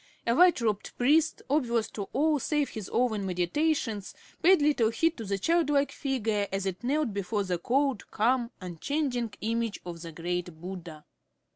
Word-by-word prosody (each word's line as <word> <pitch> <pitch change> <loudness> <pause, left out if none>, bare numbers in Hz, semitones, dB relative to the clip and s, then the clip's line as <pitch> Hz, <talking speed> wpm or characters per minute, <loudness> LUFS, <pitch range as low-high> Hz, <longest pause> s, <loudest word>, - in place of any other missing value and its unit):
A 235 - +3
white 355 +4 +5
robed 215 -3 -2
priest, 310 +5 +3
oblivious 240 -6 +1
to 200 -2 -5
all 300 +2 +2
save 295 +2 0
his 215 -3 -7
own 230 -4 +1
meditations, 205 - -1 0.3
paid 370 +1 +6
little 290 -7 +3
heed 325 +8 +1
to 225 - -6
the 200 0 -1
childlike 290 - +2
figure 225 -8 -1
as 195 0 -2
it 190 +3 -4
knelt 280 -2 0
before 200 +1 -1
the 180 -2 -2
cold, 270 +3 0
calm, 240 +2 +1
unchanging 240 - -2
image 230 0 -1
of 170 -2 -7
the 165 -1 -7
great 175 0 -4
Buddha. 175 -3 -8
230 Hz, 160 wpm, -28 LUFS, 195-285 Hz, 0.3 s, paid